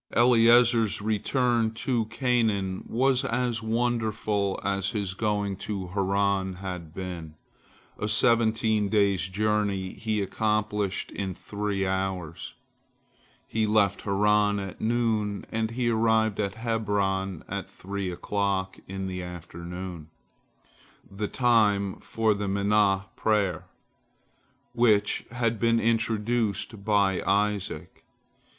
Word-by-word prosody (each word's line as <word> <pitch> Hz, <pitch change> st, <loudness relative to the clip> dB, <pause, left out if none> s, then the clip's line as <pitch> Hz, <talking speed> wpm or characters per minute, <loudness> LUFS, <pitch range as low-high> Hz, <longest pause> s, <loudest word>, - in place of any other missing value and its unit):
Eliezer's 115 Hz, -2 st, +5 dB
return 115 Hz, +2 st, +1 dB
to 120 Hz, -1 st, 0 dB
Canaan 110 Hz, -5 st, 0 dB
was 130 Hz, +2 st, +2 dB
as 125 Hz, -3 st, -1 dB
wonderful 110 Hz, -3 st, 0 dB
as 100 Hz, 0 st, 0 dB
his 100 Hz, -3 st, -3 dB
going 105 Hz, -1 st, -1 dB
to 95 Hz, -2 st, -4 dB
Haran 100 Hz, 0 st, 0 dB
had 90 Hz, -4 st, -6 dB
been. 85 Hz, -3 st, -7 dB, 0.6 s
A 105 Hz, -, -2 dB
seventeen 110 Hz, -1 st, +3 dB
days' 100 Hz, -3 st, +2 dB
journey 100 Hz, -2 st, 0 dB
he 110 Hz, -2 st, -2 dB
accomplished 105 Hz, 0 st, -1 dB
in 95 Hz, -2 st, -4 dB
three 100 Hz, -1 st, -3 dB
hours. 95 Hz, -3 st, -3 dB, 0.9 s
He 110 Hz, -1 st, 0 dB
left 105 Hz, -2 st, +2 dB
Haran 105 Hz, +1 st, +2 dB
at 95 Hz, -2 st, -6 dB
noon, 110 Hz, -3 st, 0 dB
and 110 Hz, 0 st, -1 dB
he 120 Hz, 0 st, 0 dB
arrived 110 Hz, -2 st, +2 dB
at 100 Hz, -1 st, -1 dB
Hebron 100 Hz, -5 st, -1 dB
at -, -, -5 dB
three 100 Hz, 0 st, -5 dB
o'clock 95 Hz, +1 st, -2 dB
in 95 Hz, 0 st, -5 dB
the 90 Hz, -1 st, -4 dB
afternoon, 90 Hz, -1 st, -7 dB, 1.0 s
the 100 Hz, +2 st, -3 dB
time 105 Hz, -6 st, +2 dB
for 110 Hz, -1 st, +1 dB
the 100 Hz, 0 st, -3 dB
Minhah 100 Hz, 0 st, +2 dB
Prayer, 100 Hz, -6 st, 0 dB, 1.1 s
which 115 Hz, -4 st, +2 dB
had 115 Hz, -2 st, -1 dB
been 115 Hz, 0 st, +3 dB
introduced 115 Hz, -2 st, 0 dB
by 100 Hz, -3 st, +2 dB
Isaac. 100 Hz, 0 st, -1 dB
105 Hz, 105 wpm, -27 LUFS, 95-110 Hz, 1.1 s, Eliezer's